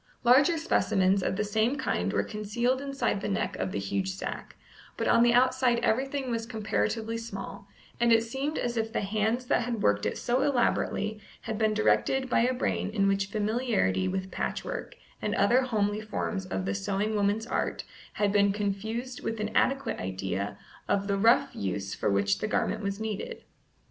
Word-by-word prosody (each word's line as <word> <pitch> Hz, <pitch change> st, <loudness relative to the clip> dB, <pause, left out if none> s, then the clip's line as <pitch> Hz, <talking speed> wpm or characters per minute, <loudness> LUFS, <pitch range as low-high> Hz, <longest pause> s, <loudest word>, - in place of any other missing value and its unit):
Larger 275 Hz, +7 st, +5 dB
specimens 195 Hz, -, +2 dB
of 190 Hz, -, -1 dB
the 210 Hz, -, 0 dB
same 220 Hz, +5 st, +1 dB
kind -, -, -1 dB
were -, -, +1 dB
concealed 235 Hz, +5 st, -1 dB
inside 275 Hz, -7 st, -1 dB
the -, -, -2 dB
neck 195 Hz, -, -1 dB
of 95 Hz, 0 st, -2 dB
the -, -, -3 dB
huge 145 Hz, -, -1 dB
sack, 190 Hz, 0 st, -6 dB, 0.4 s
but -, -, -1 dB
on -, -, +5 dB
the 240 Hz, 0 st, +5 dB
outside 255 Hz, 0 st, +3 dB
everything 265 Hz, +2 st, 0 dB
was 230 Hz, -1 st, -2 dB
comparatively 225 Hz, 0 st, -1 dB
small, 200 Hz, -3 st, -7 dB, 0.3 s
and 235 Hz, 0 st, +3 dB
it 225 Hz, 0 st, +5 dB
seemed 270 Hz, +6 st, -3 dB
as 240 Hz, -1 st, -2 dB
if 225 Hz, 0 st, -1 dB
the -, -, -1 dB
hands 220 Hz, +5 st, 0 dB
that 245 Hz, -, +2 dB
had 235 Hz, -2 st, -3 dB
worked 105 Hz, 0 st, +2 dB
it -, -, -3 dB
so 245 Hz, +2 st, 0 dB
elaborately 220 Hz, -5 st, 0 dB, 0.2 s
had 220 Hz, -2 st, -4 dB
been 215 Hz, -1 st, +2 dB
directed 260 Hz, +4 st, +2 dB
by -, -, +4 dB
a 240 Hz, +2 st, +3 dB
brain 250 Hz, -5 st, -1 dB
in 200 Hz, -2 st, +1 dB
which 195 Hz, 0 st, +1 dB
familiarity 210 Hz, -, 0 dB
with 190 Hz, -, -3 dB
patchwork, -, -, -4 dB, 0.3 s
and -, -, -1 dB
other 250 Hz, +2 st, +4 dB
homely 210 Hz, -4 st, 0 dB
forms 205 Hz, -2 st, -3 dB
of 95 Hz, -, -3 dB
the 100 Hz, -, -1 dB
sewing 195 Hz, -, -1 dB
woman's 205 Hz, +2 st, +1 dB
art, -, -, -2 dB, 0.3 s
had 205 Hz, -1 st, +1 dB
been 200 Hz, -1 st, +4 dB
confused 220 Hz, +5 st, -3 dB
with 225 Hz, -1 st, -3 dB
an 215 Hz, +1 st, -3 dB
adequate 270 Hz, +1 st, +1 dB
idea 95 Hz, +2 st, -3 dB, 0.3 s
of 200 Hz, 0 st, +1 dB
the 200 Hz, -1 st, 0 dB
rough 225 Hz, +5 st, +4 dB
use 100 Hz, 0 st, -3 dB
for -, -, -1 dB
which 100 Hz, 0 st, +2 dB
the -, -, -1 dB
garment 225 Hz, 0 st, 0 dB
was 200 Hz, 0 st, -3 dB
needed. 220 Hz, -2 st, -4 dB
215 Hz, 185 wpm, -28 LUFS, 195-240 Hz, 0.4 s, Larger